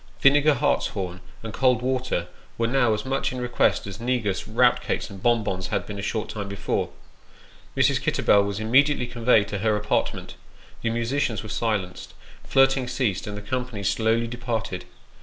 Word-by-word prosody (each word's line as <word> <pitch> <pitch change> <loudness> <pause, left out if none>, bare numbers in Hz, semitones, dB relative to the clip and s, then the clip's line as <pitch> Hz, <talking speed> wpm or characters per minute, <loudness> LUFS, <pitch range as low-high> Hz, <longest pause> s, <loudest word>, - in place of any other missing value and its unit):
Vinegar, 145 +2 +5
hartshorn, 95 -6 -1 0.2
and 110 -1 -6
cold 125 -2 +2
water, 130 -9 -1 0.3
were 115 - +1
now 120 -1 +2
as 105 -1 -1
much 135 +1 -1
in 130 - -5
request 125 0 +1
as 100 +1 -7
negus, 115 -6 -1
rout - - +3
cakes, - - -3
and 95 -1 -10
bon 120 -1 +3
bons 95 -2 -3
had - - -2
been 105 -1 -6
a - - -3
short 105 +2 -2
time 105 -2 -5
before. 100 - -2 0.9
Mrs. - - +3
Kitterbell 100 -1 +3
was 100 0 -3
immediately 130 +4 +3
conveyed 120 -3 +2
to 105 - -3
her 110 +1 +2
apartment, 105 0 -2 0.4
the 115 - 0
musicians 115 0 -1
were 110 - -8
silenced, 105 -5 -3 0.3
flirting 135 -1 +3
ceased, 120 -7 -1
and 105 0 -5
the 105 - -8
company 125 -2 -4
slowly 110 +4 +1
departed. 115 -5 -4
115 Hz, 170 wpm, -24 LUFS, 100-125 Hz, 0.9 s, Vinegar